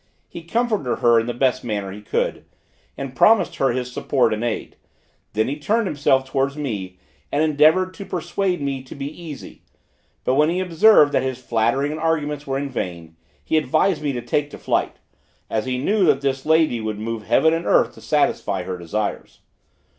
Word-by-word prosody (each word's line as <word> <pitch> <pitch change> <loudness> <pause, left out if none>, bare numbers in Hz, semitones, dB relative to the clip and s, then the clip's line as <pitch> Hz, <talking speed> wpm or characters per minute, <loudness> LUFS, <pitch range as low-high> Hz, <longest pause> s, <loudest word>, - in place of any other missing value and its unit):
He 170 - -9
comforted 215 - -1
her 120 -1 +6
in 115 - -3
the 120 - -2
best 130 0 +1
manner 105 -4 -3
he 105 +2 -9
could, 105 - -2 0.5
and 135 -1 -6
promised 220 +5 +4
her 135 - +2
his 125 0 -2
support 125 -3 +1
and 110 +2 -3
aid; 120 -2 -3 0.6
then 110 +1 +1
he 140 +3 -3
turned 220 +9 +1
himself 140 -5 +1
towards 135 +1 -1
me 100 -11 -4 0.3
and 145 +2 +1
endeavored 160 +5 +3
to 200 - -8
persuade 180 -1 -2
me 135 -1 -2
to 130 - -11
be 140 -1 -5
easy; 155 -1 -9 0.6
but 130 - +1
when 150 +3 +3
he 175 +2 0
observed 180 -3 +5
that - - +2
his 130 -1 -3
flattering 120 +3 0
and 155 +1 -5
arguments 150 -3 -1
were 135 0 -1
vain, 85 -11 -5 0.3
he 160 - +1
advised 155 +5 +1
me 145 -2 -1
to 120 -1 -4
take 145 +4 -1
to - - -10
flight, - - -1 0.6
as 110 +3 -1
he 125 -1 -1
knew 200 +10 +1
that 145 -4 +3
this 135 0 -2
lady 160 -7 +3
would 110 -1 -3
move 115 +1 -4
heaven 160 +8 +4
and 165 +1 -2
earth - - +3
to - - -15
satisfy - - 0
her 90 -1 -5
desires. 100 +5 -4
140 Hz, 190 wpm, -21 LUFS, 120-160 Hz, 0.6 s, her